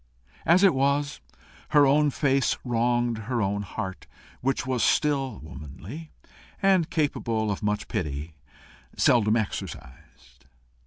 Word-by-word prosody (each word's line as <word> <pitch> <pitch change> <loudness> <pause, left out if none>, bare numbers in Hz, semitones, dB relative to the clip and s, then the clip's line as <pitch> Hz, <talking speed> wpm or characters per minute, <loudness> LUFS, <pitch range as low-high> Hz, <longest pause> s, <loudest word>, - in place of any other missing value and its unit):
As 175 +4 +5
it 195 - +6
was, 140 +2 0 0.5
her 145 -2 +6
own 145 +2 +4
face 135 -1 +1
wronged 120 -1 +1
her 120 -2 0
own 100 -1 0
heart, 95 -1 -6 0.3
which 130 0 0
was 130 -2 0
still 135 -6 +1
womanly, 80 - -9 0.5
and 190 -4 +3
capable 115 -9 0
of 100 - -4
much 105 0 -1
pity 75 - -4 0.6
seldom 110 -3 +4
exercised. 70 - -6
120 Hz, 115 wpm, -26 LUFS, 100-145 Hz, 0.6 s, it